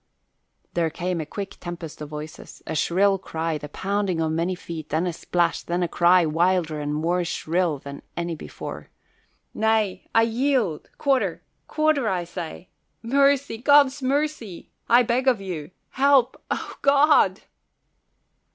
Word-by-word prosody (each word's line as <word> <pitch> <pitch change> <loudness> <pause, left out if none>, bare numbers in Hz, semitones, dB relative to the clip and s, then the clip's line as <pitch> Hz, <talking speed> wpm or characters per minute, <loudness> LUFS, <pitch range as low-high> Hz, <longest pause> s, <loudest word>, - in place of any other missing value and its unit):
There 170 -2 +1
came 175 +1 -3
a 155 - -7
quick 200 -1 -6
tempest 170 -3 -7
of 150 - -6
voices, 150 +1 -9
a - - -4
shrill 195 +5 +2
cry, 160 -3 -3
the 150 - -8
pounding 195 +1 -1
of 160 -1 0
many 170 +3 -1
feet, 165 -3 -8
then 160 +4 0
a 175 - -2
splash, 170 0 0
then 175 +1 -1
a - - +1
cry 175 +1 +4
wilder 165 0 +1
and 145 0 -3
more 170 +4 0
shrill 170 -1 -1
than 140 +1 -9 0.2
any 170 0 -2
before, 155 - -8 0.6
"Nay, 220 -4 0
I 225 - +6
yield 230 - 0
quarter! 275 -3 0 0.2
Quarter, 310 -6 +1
I 180 -2 -1
say! 175 0 -7 0.3
Mercy! 275 -1 +2
God's 285 +1 +5
mercy, 270 - -2 0.2
I 240 +1 +6
beg 245 +3 0
of 250 -5 +4
you! 175 -6 -6 0.2
Help 270 -2 +3
O - - -4
God!" 280 -8 +4
185 Hz, 145 wpm, -24 LUFS, 165-245 Hz, 0.6 s, I